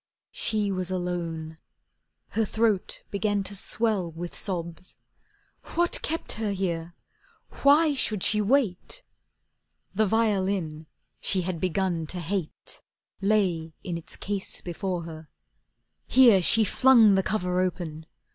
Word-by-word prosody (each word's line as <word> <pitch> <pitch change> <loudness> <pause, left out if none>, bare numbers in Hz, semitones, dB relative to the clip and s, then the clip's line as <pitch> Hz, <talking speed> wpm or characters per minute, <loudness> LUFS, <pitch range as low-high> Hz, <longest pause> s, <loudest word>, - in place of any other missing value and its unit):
She 215 - 0
was 185 -1 -2
alone. 170 -3 -4 0.7
Her 225 - 0
throat 220 -2 0
began 205 0 0
to 200 +1 -5
swell 200 -3 0
With 170 +2 -7
sobs. 175 -2 -5 0.8
What 345 0 +1
kept 325 +1 -3
her 220 -1 -2
here, 170 -3 -3 0.7
why 295 +2 +5
should 215 -7 0
she 210 0 +3
wait? 245 - 0 0.9
The 215 +2 +2
violin 190 -7 0 0.3
she 185 -2 +1
had 175 -2 -3
begun 180 -2 -1
to 180 - -4
hate 175 -1 -4 0.4
Lay 185 -6 +1
in 175 - -4
its 170 - -6
case 200 -1 -3
before 175 0 -3
her. 160 -1 -10 0.8
Here 235 -7 +6
she 220 +5 +5
flung 230 -1 +5
The 190 - +3
cover 180 -3 -1
open. 165 -3 -4
190 Hz, 120 wpm, -26 LUFS, 170-215 Hz, 0.9 s, Here